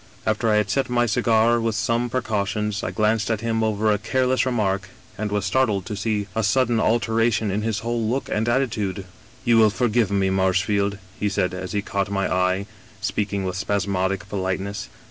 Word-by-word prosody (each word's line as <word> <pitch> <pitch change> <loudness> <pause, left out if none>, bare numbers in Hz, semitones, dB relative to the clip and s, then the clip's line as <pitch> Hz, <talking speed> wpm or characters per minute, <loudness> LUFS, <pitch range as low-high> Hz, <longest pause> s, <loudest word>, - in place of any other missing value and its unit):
" 105 - -26
After 110 +1 +1
I 105 - +4
had 105 -1 +1
selected 135 -2 0
my 120 0 +3
cigar 115 0 +3
with 115 -1 0
some 120 +2 0
precautions, 105 -4 -1
I - - -1
glanced 105 +4 +1
at 110 -2 0
him 115 -1 0
over 110 0 +1
a 105 - +1
careless 130 +4 +1
remark, 100 -5 0 0.3
and 105 0 -3
was 105 -2 0
startled 110 -8 +1
to 105 - -4
see 105 0 -1
a 110 - +1
sudden 120 +2 +2
alteration 115 -1 +1
in 105 +3 -1
his 110 -1 -1
whole 120 0 -1
look 130 +3 -1
and 110 +2 0
attitude. 105 -7 -1
" 110 - -25
* 125 +2 -26
You 120 -2 +5
will 110 -1 +6
forgive 115 -1 +1
me, 100 -1 +1
Marshfield,' 95 +2 +1 0.2
he 105 - +1
said, 90 -2 0
as 90 +1 -5
he 100 -1 -1
caught 100 0 -2
my 95 -1 0
eye, 95 +2 +1 0.3
speaking 100 -1 -2
with 90 -1 -3
spasmodic 100 0 -1
politeness. 95 +1 -3
105 Hz, 200 wpm, -23 LUFS, 100-115 Hz, 0.3 s, will